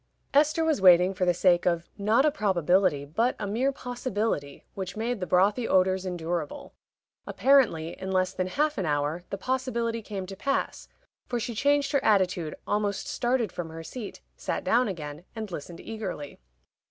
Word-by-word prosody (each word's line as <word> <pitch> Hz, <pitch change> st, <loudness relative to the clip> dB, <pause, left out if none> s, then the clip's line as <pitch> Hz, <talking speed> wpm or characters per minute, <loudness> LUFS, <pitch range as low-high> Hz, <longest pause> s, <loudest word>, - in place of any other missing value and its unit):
Esther 305 Hz, +3 st, +3 dB
was 310 Hz, -10 st, +1 dB
waiting 180 Hz, 0 st, +7 dB
for 185 Hz, -1 st, 0 dB
the 180 Hz, -, +4 dB
sake 175 Hz, -1 st, +3 dB
of 170 Hz, -1 st, 0 dB
not 220 Hz, +7 st, +3 dB
a 305 Hz, -, +4 dB
probability, 185 Hz, -, +2 dB
but 225 Hz, -, 0 dB
a 210 Hz, -, -4 dB
mere 235 Hz, +7 st, 0 dB
possibility, 225 Hz, -, -3 dB
which 190 Hz, 0 st, -6 dB
made 230 Hz, +1 st, -2 dB
the 180 Hz, -, -3 dB
brothy 205 Hz, +7 st, +2 dB
odors 185 Hz, 0 st, +2 dB
endurable. 170 Hz, -3 st, -4 dB, 0.5 s
Apparently, 240 Hz, -, +3 dB
in 190 Hz, 0 st, -3 dB
less 185 Hz, -1 st, +1 dB
than 185 Hz, -, -2 dB
half 295 Hz, +7 st, 0 dB
an 190 Hz, -, -1 dB
hour, 150 Hz, +3 st, -1 dB
the 195 Hz, -, -3 dB
possibility 235 Hz, -1 st, -1 dB
came 200 Hz, -3 st, -5 dB
to 195 Hz, +1 st, -8 dB
pass, 275 Hz, +8 st, -2 dB, 0.4 s
for 245 Hz, -, -2 dB
she 235 Hz, +1 st, -3 dB
changed 285 Hz, +5 st, +2 dB
her 280 Hz, -3 st, +1 dB
attitude, 185 Hz, -6 st, +2 dB
almost 205 Hz, +4 st, -1 dB
started 245 Hz, -7 st, 0 dB
from 170 Hz, -2 st, -5 dB
her 165 Hz, 0 st, -8 dB
seat, 220 Hz, +4 st, -8 dB
sat -, -, -3 dB
down 245 Hz, +2 st, +3 dB
again, 155 Hz, -4 st, -6 dB
and 220 Hz, -3 st, -5 dB
listened 165 Hz, +1 st, -7 dB
eagerly. 195 Hz, -10 st, -6 dB
195 Hz, 170 wpm, -27 LUFS, 175-245 Hz, 0.5 s, waiting